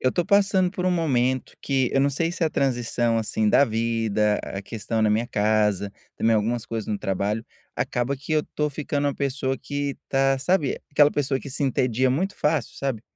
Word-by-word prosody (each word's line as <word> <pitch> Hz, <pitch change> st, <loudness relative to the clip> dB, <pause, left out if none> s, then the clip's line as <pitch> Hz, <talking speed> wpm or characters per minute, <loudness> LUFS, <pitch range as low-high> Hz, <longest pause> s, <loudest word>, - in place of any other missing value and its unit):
eu 130 Hz, -, +2 dB
estou 175 Hz, +6 st, 0 dB
passando 195 Hz, -2 st, +3 dB
por 180 Hz, -1 st, -3 dB
um -, -, +3 dB
momento 130 Hz, -7 st, 0 dB
que 135 Hz, -3 st, 0 dB
eu 135 Hz, -, +3 dB
não 140 Hz, -, +3 dB
sei 165 Hz, +4 st, -1 dB
se 175 Hz, -1 st, -1 dB
a -, -, +2 dB
transição 120 Hz, -4 st, 0 dB
assim 110 Hz, -1 st, 0 dB
da 140 Hz, -, +5 dB
vida, 110 Hz, -2 st, 0 dB
a 95 Hz, -, -6 dB
questão 110 Hz, +1 st, -3 dB
na 110 Hz, -, +3 dB
minha 110 Hz, +3 st, +1 dB
casa, 105 Hz, -2 st, +1 dB, 0.2 s
também 115 Hz, 0 st, +3 dB
algumas 115 Hz, +2 st, -1 dB
coisas 115 Hz, -2 st, -4 dB
no 105 Hz, -, -1 dB
trabalho, 100 Hz, +3 st, -2 dB, 0.3 s
acaba 120 Hz, +3 st, -1 dB
que 145 Hz, +4 st, -12 dB
eu 155 Hz, -, +4 dB
estou 150 Hz, 0 st, -3 dB
ficando 145 Hz, 0 st, -1 dB
uma 140 Hz, -, -2 dB
pessoa 135 Hz, -1 st, -2 dB
que 145 Hz, +1 st, -3 dB
está, 135 Hz, 0 st, +2 dB
sabe, 150 Hz, -1 st, +1 dB
aquela 145 Hz, 0 st, +5 dB
pessoa 140 Hz, -2 st, -1 dB
que 140 Hz, -, -8 dB
se 140 Hz, +2 st, -2 dB
entedia 130 Hz, -1 st, +1 dB
muito 185 Hz, +10 st, -1 dB
fácil, 150 Hz, -5 st, 0 dB
sabe, 135 Hz, -6 st, -3 dB
130 Hz, 200 wpm, -24 LUFS, 115-145 Hz, 0.3 s, da